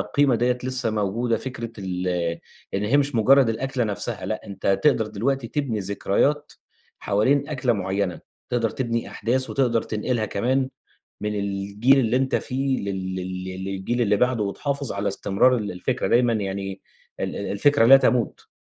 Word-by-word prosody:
القيمة 135 +5 +2
دِيّة 125 +2 +1
لسّه 130 -2 -1
موجودة 110 +3 0
فكرة 115 0 -6
ال 90 -1 -3 0.7
إن 100 +2 0
هي 115 +7 +3
مش 145 -2 +1
مُجرّد 130 +3 +5
الأكلة 125 +2 -1
نفسها 105 -3 -3
لأ، - - -4
أنت 95 0 -1
تقدر 125 -7 +3
دلوقتي 120 +4 -2
تبني 135 -8 -2
ذكريات 100 +9 0 0.5
حوالين 130 +8 +1
أكلة 130 -4 0
معيّنة. 95 -4 -2 0.3
تقدر 115 -3 +1
تبني 115 -3 -2
أحداث 130 +3 -1
وتقدر 120 -5 +1
تنقلها 110 +1 -2
كمان 130 +7 0 0.5
من 105 0 -2
الجيل 100 +6 +2
اللي 120 0 +2
أنت 130 0 +1
فيه 135 +1 -1
لل 95 -1 -3
لل 95 0 -4
ل 95 0 -6
للجيل 100 +5 -2
اللي 105 -2 +3
بعده 125 -2 +2
وتحافظ 140 +6 -3
على 100 +1 -2
استمرار 100 +6 +2
ال 105 -3 -3
الفكرة 120 +8 -2
دايمًا. 120 -1 +3
يعني 95 -2 -3 0.4
ال - - -3
ال 100 - -3
الفكرة 140 +4 +4
لا 135 +3 +9
تموت. 125 -4 0
115 Hz, 160 wpm, -24 LUFS, 100-130 Hz, 0.7 s, لا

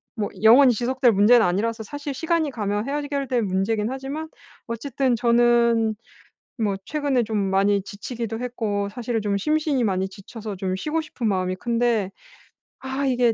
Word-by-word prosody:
뭐 210 -3 -2
영원히 250 +3 +7
지속될 245 +2 +2
문제는 220 +4 +5
아니라서 220 +5 -1
사실 285 +5 -6
시간이 325 -1 0
가면 210 0 -2
해결될 280 -4 -1
문제이긴 210 +4 0
하지만 275 +4 -5 0.4
어쨌든 255 +1 -1
저는 235 -1 +3 0.6
뭐 205 -3 0
최근에 285 -5 0
좀 215 0 -3
많이 195 +1 +2
지치기도 225 +3 -6
했고 215 -5 -2
사실은 235 0 -3
좀 205 -1 0
심신이 300 +2 +1
많이 190 -1 0
지쳐서 205 +1 -8
좀 185 0 -2
쉬고 310 +10 -2
싶은 250 -7 -3
마음이 185 -1 0
큰데 230 -3 0 0.7
'아 265 +1 -3
이게 245 -3 +2
230 Hz, 335 characters per minute, -23 LUFS, 205-265 Hz, 0.7 s, 영원히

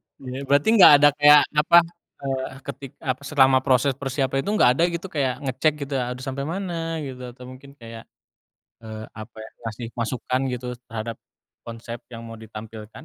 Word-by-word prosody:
Iya, 135 +1 -7
berarti 145 +8 +3
nggak 185 - +10
ada 145 +1 +6
kayak 145 0 +7 0.2
apa 170 +3 +5 0.5
eee, 135 -1 -2 0.2
ketik 135 -1 -8
ah, 130 -1 -2
selama 135 -2 +3
proses 130 +1 +2
persiapan 135 0 -1
itu - - +1
nggak 165 - +5
ada - - +5
gitu 170 +2 -4
kayak 140 -2 -2
ngecek 135 +3 +1
gitu? 140 0 -7
Harus 125 +1 -4
sampai 140 +1 -4
mana, 165 -3 -4
gitu 130 -2 -7 0.2
atau 125 - -13
mungkin 140 +2 -14
kayak, 115 -3 -11 0.8
eee, 110 -1 -8
apa 110 +1 -11
ya, 110 0 -9 0.2
kasih 115 +2 -7
masukan 125 +2 -2
gitu 125 0 -5 0.2
terhadap 115 0 -5 0.5
konsep 115 0 -8
yang 115 -1 -9
mau 115 - -9
ditampilkan? 110 0 -10
130 Hz, 170 wpm, -23 LUFS, 115-145 Hz, 0.8 s, nggak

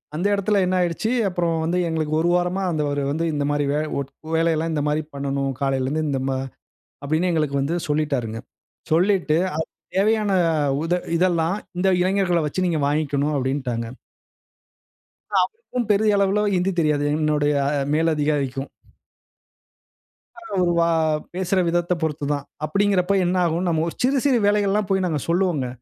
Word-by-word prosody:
அந்த 180 +5 0
எடத்ல 200 0 +1
என்ன 185 - 0
ஆயிடுச்சு! 175 +6 -1 0.2
அப்பறம் 170 -3 -1
வந்து 170 +3 0
எங்களுக்கு 155 -2 -2
1 170 +2 +2
வாரமா 180 +2 0
அந்த 155 -2 -1
அவரு 145 0 -1
வந்து 160 +3 -1
இந்த 145 -1 -1
மாரி 145 0 0
"வேல 150 +1 0
ஓட் 140 -1 -3 0.3
வேலையல்லாம் 165 0 +1
இந்த 150 - 0
மாரி 150 +1 +1
பண்ணணும். 140 0 -2
காலைலருந்து 135 +3 0
இந்த 135 -2 -1
மா" 130 - 0 0.7
அப்டின்னு 160 +5 +1
எங்களுக்கு 150 -4 0
வந்து 155 +5 -1
சொல்லிட்டாருங்க. 140 -7 -1 0.5
சொல்லிட்டு 175 -2 +3 0.2
அ - - -1 0.4
"தேவையான 210 +1 +2 0.5
உத 165 +2 0 0.2
இதெல்லாம் 170 +1 +1 0.2
இந்த 190 +2 +2
இளைஞர்கள 185 -2 +1
வச்சி 185 +5 -1
நீங்க 165 -4 0
வாங்கிக்கணும்" 145 0 0
அப்டின்ட்டாங்க. 130 -3 -2 1.6
அவருக்கும் 440 - -3
பெரிய 210 0 +3
அளவுல 200 +1 +2
ஹிந்தி 180 +2 +1
தெரியாது. 150 -2 +1
என்னுடைய 150 -1 +1 0.4
மேல் 165 +1 +2
அதிகாரிக்கும். 145 -2 -1 1.7
அ - - -9 0.2
ஒரு 175 - +2
வா 170 - +3 0.5
பேசுற 185 +1 0
விதத்தப் 175 0 0
பொறுத்து 150 -2 -2
தான். 145 -1 -4 0.2
அப்டிங்கிறப்ப 200 +2 +1
என்ன 180 +1 0
ஆகும்? 170 +2 0
நம்ம 160 -2 +1
ஒ - - 0
சிறு 270 +2 +3
சிறு 260 -4 +4
வேலைகள்லாம் 205 -1 +1
போய் 190 -1 +1
நாங்க 155 -5 -1
சொல்லுவோங்க. 170 -7 +1
165 Hz, 150 wpm, -22 LUFS, 145-185 Hz, 1.7 s, சிறு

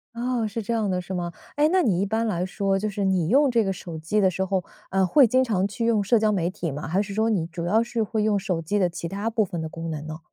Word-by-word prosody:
哦， 240 -1 -1
是 220 +2 -4
这 215 - -4
样 225 -3 +1
的 180 0 -1
是 180 - -10
吗？ 175 -2 -3 0.2
哎， 295 +1 +4
那 370 0 +4
你 195 - +2
一 195 - +1
般 220 +3 0
来 180 -4 -1
说， 195 0 0
就 215 +2 -1
是 205 -1 -3
你 185 -4 +1
用 280 +5 +5
这 235 -2 +3
个 195 -1 -1
手 170 -3 -8
机 170 +7 0
的 190 - +4
时 190 +1 -2
候， 190 -1 -1 0.3
啊， 190 0 +2
会 265 - +6
经 255 +3 +3
常 200 -6 0
去 230 +3 -2
用 215 -3 +2
社 230 +3 +3
交 215 0 +2
媒 180 -3 0
体 170 -4 -4
吗？ 145 +2 -5
还 185 +6 +1
是 200 -1 -5
说 220 +1 +2
你 170 -6 0
主 170 0 -5
要 220 +6 +3
是 235 -1 -1
会 215 +1 -1
用 210 -1 +2
手 185 -4 -2
机 185 +6 -1
的 185 -3 +3
其 170 0 -5
他 200 +5 -4
部 225 -1 +2
分 175 -4 -5
的 160 - -3
功 165 +1 -6
能 155 -1 -5
呢？ 155 0 -6
200 Hz, 325 characters per minute, -24 LUFS, 175-220 Hz, 0.3 s, 会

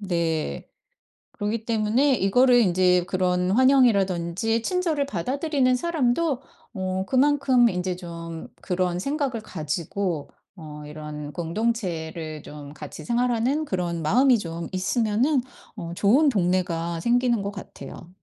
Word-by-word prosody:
네. 165 - -2 0.6
그러기 215 +2 -3
때문에 230 +5 +2
이거를 245 +4 +4
인제 180 -3 +3
그런 180 -1 +1
환영이라든지 225 -5 +3
친절을 335 -3 0
받아들이는 270 - 0
사람도 300 -2 0 0.3
어 190 -1 -2
그만큼 265 -2 +4
인제 180 -2 -2
좀 170 -2 -8 0.2
그런 180 -1 -1
생각을 275 - -2
가지고 165 -1 -3 0.3
어 150 -3 -9
이런 150 -1 -7
공동체를 165 -5 -3
좀 145 -1 -10
같이 150 -2 -9
생활하는 245 +4 +1
그런 175 - -2
마음이 245 - +4
좀 165 -3 -5
있으면은 225 +8 +1 0.4
어 170 -5 -6
좋은 255 - +4
동네가 175 -6 0
생기는 240 +1 +2
것 200 - -3
같아요. 195 -3 -10
195 Hz, 275 characters per minute, -24 LUFS, 170-250 Hz, 0.6 s, 이거를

